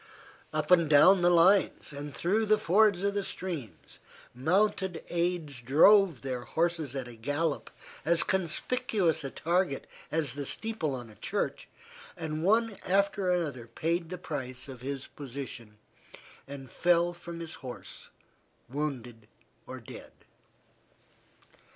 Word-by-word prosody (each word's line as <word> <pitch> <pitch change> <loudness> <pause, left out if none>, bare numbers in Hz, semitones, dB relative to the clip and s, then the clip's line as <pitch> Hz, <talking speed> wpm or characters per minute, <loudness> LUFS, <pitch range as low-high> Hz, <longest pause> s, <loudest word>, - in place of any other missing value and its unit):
Up 155 +2 -2
and 170 -4 +5
down 175 +6 +7
the 175 - +5
lines, 175 -1 +4
and 145 +1 -6
through 210 +9 0
the 215 +1 +5
fords 210 -2 +3
of 200 0 +1
the 200 -1 -1
streams, 175 - -6 0.3
mounted 180 +5 +1
aides 170 -6 -1
drove 160 - +5
their 130 -2 -3
horses 160 0 -1
at 130 -2 -4
a 120 - -10
gallop, 145 +6 -2 0.3
as 170 +1 +4
conspicuous 190 - 0
a 135 - -3
target 170 -1 0 0.3
as 155 -5 +1
the 140 -1 -4
steeple 220 -11 -1
on 120 -3 -8
a - - -16
church, 200 +3 -3 0.5
and 155 -2 -4
one 220 +2 +2
after 195 0 +1
another 150 -10 -1
paid 165 +7 -2
the 180 - -5
price 130 -7 -5
of 130 -3 -10
his 135 0 -4
position 125 -6 -8 0.7
and 135 -1 -9
fell 175 0 +2
from 170 -1 -9
his 165 -1 -6
horse 125 -3 -9 0.6
wounded 125 -5 -5 0.4
or - - -7
dead. - - -11
165 Hz, 130 wpm, -29 LUFS, 135-185 Hz, 0.7 s, down